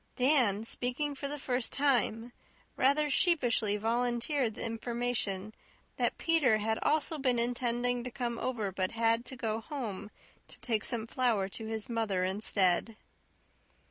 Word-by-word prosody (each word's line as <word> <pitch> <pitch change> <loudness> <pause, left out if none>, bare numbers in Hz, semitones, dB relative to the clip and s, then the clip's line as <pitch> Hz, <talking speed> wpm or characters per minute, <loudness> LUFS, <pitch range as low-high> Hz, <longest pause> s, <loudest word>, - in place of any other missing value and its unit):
Dan 250 -6 +3
speaking 250 +5 -2
for 280 0 -5
the 295 +1 -4
first 250 -3 -1
time, 245 -4 +1 0.4
rather 285 +3 +3
sheepishly 250 - +3
volunteered 240 +2 0
the - - -4
information 225 -3 -1 0.4
that - - 0
Peter 300 -9 +3
had 220 +1 -1
also 310 +1 +1
been 255 -3 +1
intending 245 0 0
to 250 - -4
come 235 -1 -3
over 225 -6 -2
but 185 0 -1
had 230 +1 +1
to 265 - -6
go 225 -2 -2
home 220 -8 -5 0.4
to - - -14
take 220 -4 -1
some 230 -3 -1
flour 230 -5 +1
to 220 +3 -6
his 220 -1 -4
mother 220 -6 -1
instead. 195 +1 +1
235 Hz, 140 wpm, -31 LUFS, 220-255 Hz, 0.4 s, Dan